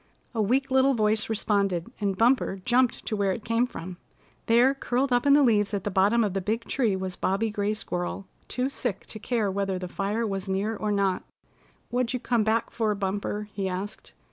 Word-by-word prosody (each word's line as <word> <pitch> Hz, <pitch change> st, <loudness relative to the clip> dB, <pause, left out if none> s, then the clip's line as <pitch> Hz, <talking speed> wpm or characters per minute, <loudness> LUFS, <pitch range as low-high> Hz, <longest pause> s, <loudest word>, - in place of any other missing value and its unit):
A 225 Hz, -, 0 dB
weak 260 Hz, +6 st, +1 dB
little 265 Hz, +1 st, +4 dB
voice 215 Hz, -1 st, +1 dB
responded, 200 Hz, -3 st, 0 dB
and 195 Hz, -2 st, 0 dB
Bumper 230 Hz, -4 st, +2 dB
jumped 245 Hz, 0 st, +2 dB
to 215 Hz, -, -1 dB
where 200 Hz, -2 st, +1 dB
it 210 Hz, -, -7 dB
came 230 Hz, +2 st, +2 dB
from. 180 Hz, -6 st, -8 dB, 0.5 s
There 240 Hz, +4 st, +5 dB
curled 260 Hz, -1 st, 0 dB
up 245 Hz, +3 st, +2 dB
in 280 Hz, -, +7 dB
the 290 Hz, 0 st, +6 dB
leaves 210 Hz, -4 st, +3 dB
at 195 Hz, -, -3 dB
the 205 Hz, -, -2 dB
bottom 205 Hz, +5 st, +3 dB
of 205 Hz, -4 st, -1 dB
the 195 Hz, -, -1 dB
big 220 Hz, +5 st, -1 dB
tree 230 Hz, -5 st, 0 dB
was 190 Hz, -1 st, -4 dB
Bobby 210 Hz, +4 st, 0 dB
Gray 205 Hz, 0 st, -1 dB
Squirrel 180 Hz, -1 st, -4 dB, 0.2 s
too 255 Hz, +1 st, -1 dB
sick 245 Hz, -7 st, -3 dB
to 215 Hz, -, -9 dB
care 220 Hz, -3 st, 0 dB
whether 195 Hz, -1 st, -1 dB
the 180 Hz, 0 st, -5 dB
fire 205 Hz, +5 st, -2 dB
was 195 Hz, -2 st, -3 dB
near 200 Hz, +4 st, 0 dB
or 210 Hz, 0 st, -2 dB
not. 195 Hz, -2 st, +1 dB, 0.7 s
"What'd 245 Hz, 0 st, 0 dB
you 250 Hz, -, -1 dB
come 235 Hz, -2 st, +1 dB
back 225 Hz, +2 st, 0 dB
for, 215 Hz, -2 st, 0 dB
Bumper?" 200 Hz, +1 st, -3 dB
he 195 Hz, -1 st, -2 dB
asked. 190 Hz, +3 st, -6 dB
210 Hz, 205 wpm, -26 LUFS, 195-235 Hz, 0.7 s, in